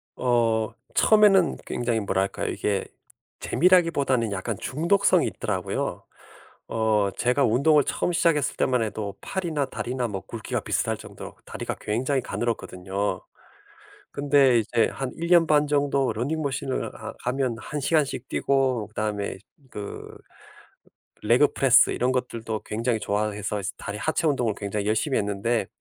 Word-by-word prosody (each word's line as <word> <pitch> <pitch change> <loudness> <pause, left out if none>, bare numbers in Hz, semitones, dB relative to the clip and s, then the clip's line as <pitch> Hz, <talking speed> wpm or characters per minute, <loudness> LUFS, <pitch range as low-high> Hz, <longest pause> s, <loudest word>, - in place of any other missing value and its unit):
어 115 -3 +1 0.2
처음에는 205 -5 +5
굉장히 120 -2 -1
뭐랄까요, 95 -1 -1
이게 100 -2 -1 0.5
재미라기보다는 145 - +2
약간 100 +3 -3
중독성이 170 +8 +2
있더라고요. - - -3 0.6
어 110 -3 +1
제가 125 +3 +2
운동을 140 +6 +4
처음 175 - -1
시작했을 165 -5 +2
때만 125 -2 +2
해도 105 -2 -4
팔이나 165 -7 -2
다리나 125 -1 -3
뭐 95 -2 -4
굵기가 - - -4
비슷할 - - -1
정도로 - - -10
다리가 - - -5
굉장히 130 +6 -1
가늘었거든요. 100 -5 -3 0.9
근데 140 -4 +4
이제 115 +1 +1
한 135 -2 -4
1 170 +1 -4
년 170 -2 +6
반 150 -1 +3
정도 140 -2 +1
러닝 145 +8 -2
머신을 135 -2 -3
하 - - -7
하면 125 -1 0
1 150 +4 -5
시간씩 140 -3 0
뛰고 130 -6 +1
그다음에 105 -1 -3 0.3
그 100 -1 -7 1.2
레그 120 +7 +4
프레스 135 -3 +5
이런 125 +2 0
것들도 115 -4 -3
굉장히 115 +1 -1
좋아해서 105 0 -2 0.2
다리 100 +1 -6
하체 155 +5 0
운동을 120 -7 0
굉장히 100 0 -3
열심히 110 +6 +1
했는데 105 +3 -1
125 Hz, 315 characters per minute, -25 LUFS, 105-145 Hz, 1.2 s, 년